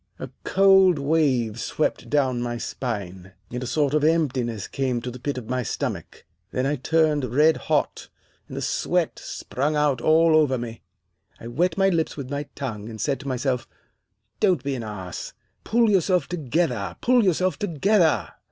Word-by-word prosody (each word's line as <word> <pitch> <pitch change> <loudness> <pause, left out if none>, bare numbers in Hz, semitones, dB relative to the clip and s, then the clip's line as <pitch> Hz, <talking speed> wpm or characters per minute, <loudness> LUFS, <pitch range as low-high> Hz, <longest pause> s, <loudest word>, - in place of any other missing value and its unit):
A - - -7
cold 190 -3 +5
wave 140 -7 +1
swept 155 - -2
down 130 -4 +1
my 120 0 -3
spine, 95 -7 -5 0.2
and 125 +1 -4
a 125 - -4
sort 145 +1 +1
of 150 -1 +2
emptiness 130 - 0
came 130 -3 -1
to 125 +1 -5
the 125 - -10
pit 140 +2 -3
of 120 -4 -6
my 125 +1 -1
stomach. 115 - -5 0.2
Then 130 - -1
I 145 +2 0
turned 155 +1 +2
red 155 +2 +5
hot, - - -1 0.4
and - - -8
the - - -3
sweat - - 0
sprung 145 +4 -2
out 145 -4 +1
all 160 +1 +4
over 145 -4 +3
me. 115 -1 -7 0.6
I - - -11
wet 165 +7 0
my 195 0 +4
lips 165 -4 -1
with 140 -2 -6
my 145 0 -3
tongue, 115 -6 -5
and 110 -1 -9
said 135 +5 -1
to 140 - -9
myself, 130 -1 -1 0.7
'Don't 185 -10 +2
be 140 0 -2
an 125 - -4
ass. 100 -5 -6 0.3
Pull 230 -1 +3
yourself 185 -1 +2
together, 135 - -1
pull 245 -1 +4
yourself 185 0 +1
together. 180 -1 +2
140 Hz, 170 wpm, -24 LUFS, 120-160 Hz, 0.7 s, cold